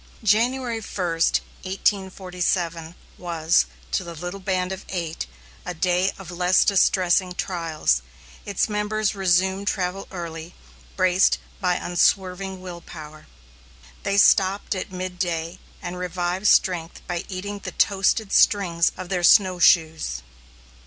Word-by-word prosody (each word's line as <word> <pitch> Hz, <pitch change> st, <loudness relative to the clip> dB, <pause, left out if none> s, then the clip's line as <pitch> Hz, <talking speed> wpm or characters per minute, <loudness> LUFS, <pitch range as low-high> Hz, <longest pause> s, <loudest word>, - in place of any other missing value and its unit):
January 230 Hz, +2 st, +1 dB
1, 190 Hz, -3 st, -3 dB, 0.5 s
1847, 180 Hz, -3 st, -2 dB, 0.2 s
was, 170 Hz, -1 st, +1 dB, 0.2 s
to -, -, 0 dB
the 170 Hz, -1 st, -8 dB
little 180 Hz, +4 st, -6 dB
band 185 Hz, -1 st, -1 dB
of 190 Hz, 0 st, -6 dB
eight, 170 Hz, -, -4 dB, 0.4 s
a 180 Hz, -, -5 dB
day 180 Hz, +3 st, +1 dB
of 185 Hz, -2 st, -10 dB
less 180 Hz, +1 st, +3 dB
distressing 185 Hz, -2 st, +3 dB
trials; 165 Hz, -, -1 dB, 0.4 s
its 200 Hz, -2 st, 0 dB
members 210 Hz, 0 st, -1 dB
resumed 190 Hz, +1 st, +1 dB
travel 185 Hz, -1 st, -2 dB
early, 170 Hz, -1 st, -7 dB, 0.4 s
braced 185 Hz, 0 st, +3 dB, 0.2 s
by 180 Hz, -2 st, +1 dB
unswerving 185 Hz, +1 st, 0 dB
will 175 Hz, -2 st, -8 dB
power. 155 Hz, -2 st, -11 dB, 0.7 s
They 200 Hz, 0 st, -1 dB
stopped 195 Hz, +1 st, +4 dB
at 185 Hz, +1 st, -5 dB
midday 180 Hz, -2 st, -3 dB, 0.2 s
and 180 Hz, 0 st, -5 dB
revived 180 Hz, +2 st, -2 dB
strength 175 Hz, -4 st, +2 dB
by 175 Hz, +1 st, -3 dB
eating 200 Hz, +2 st, -5 dB
the -, -, -7 dB
toasted 195 Hz, +1 st, +1 dB
strings 175 Hz, -5 st, +3 dB
of 185 Hz, -1 st, -7 dB
their 180 Hz, -2 st, -1 dB
snowshoes. 165 Hz, -, +4 dB
185 Hz, 120 wpm, -23 LUFS, 175-195 Hz, 0.7 s, stopped